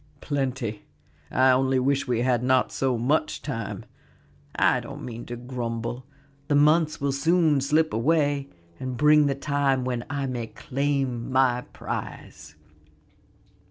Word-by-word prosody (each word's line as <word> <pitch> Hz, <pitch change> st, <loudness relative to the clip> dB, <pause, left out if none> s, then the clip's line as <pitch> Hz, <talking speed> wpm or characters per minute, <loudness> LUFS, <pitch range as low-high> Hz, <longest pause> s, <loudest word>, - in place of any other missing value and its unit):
"Plenty; 130 Hz, -8 st, -3 dB, 0.4 s
I 130 Hz, 0 st, +4 dB
only 130 Hz, +1 st, +2 dB
wish 135 Hz, +1 st, +1 dB
we 120 Hz, -2 st, 0 dB
had 125 Hz, -1 st, +2 dB
not 130 Hz, 0 st, +2 dB
so 130 Hz, -2 st, 0 dB
much. 145 Hz, +7 st, 0 dB
Yet 115 Hz, -7 st, -4 dB, 0.7 s
I -, -, +3 dB
don't -, -, -9 dB
mean 120 Hz, -1 st, -7 dB
to 120 Hz, -, -5 dB
grumble; 120 Hz, 0 st, -5 dB, 0.4 s
the 145 Hz, -, +2 dB
months 155 Hz, +2 st, +3 dB
will 140 Hz, 0 st, 0 dB
soon 160 Hz, 0 st, +2 dB
slip 155 Hz, +3 st, +2 dB
away 145 Hz, +2 st, +1 dB, 0.3 s
and 130 Hz, -1 st, -4 dB
bring 150 Hz, +1 st, +5 dB
the 140 Hz, -, 0 dB
time 140 Hz, -2 st, 0 dB
when 125 Hz, -2 st, -2 dB
I 140 Hz, -1 st, -2 dB
may 120 Hz, -3 st, -3 dB
claim 135 Hz, -3 st, -2 dB
my 125 Hz, -2 st, +2 dB
prize." 75 Hz, 0 st, -7 dB
130 Hz, 135 wpm, -25 LUFS, 120-145 Hz, 0.7 s, bring